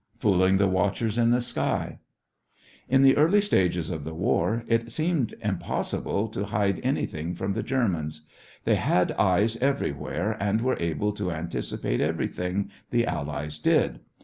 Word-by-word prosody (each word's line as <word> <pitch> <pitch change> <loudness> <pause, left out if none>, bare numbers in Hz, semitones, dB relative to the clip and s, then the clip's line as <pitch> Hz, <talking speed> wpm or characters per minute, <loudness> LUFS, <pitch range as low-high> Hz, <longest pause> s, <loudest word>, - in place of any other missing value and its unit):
FOOLING 95 -2 +3
THE 100 0 +3
WATCHERS 100 +4 0
IN 115 0 +4
THE 120 +1 +2
SKY - - -2 0.9
In 135 +2 +5
the 135 0 +7
early 165 +8 +5
stages 90 - +1
of 80 -4 -4
the 80 +2 -6
war, 110 +6 +1
it 115 0 0
seemed 155 -7 0
impossible 105 +1 -2
to 100 -1 -3
hide 100 -2 0
anything 80 +3 -2
from 95 +3 -2
the - - -2
Germans. 85 - -1 0.4
They - - +3
had 90 0 +2
eyes 105 +4 +2
everywhere 110 - -1
and 100 +2 +1
were 130 +1 +1
able 85 +5 -1
to 100 -3 -3
anticipate 80 -7 -3
everything 90 +3 -2 0.2
the 120 -1 +2
Allies 75 -1 -3
did. - - +2
100 Hz, 145 wpm, -26 LUFS, 85-115 Hz, 0.9 s, the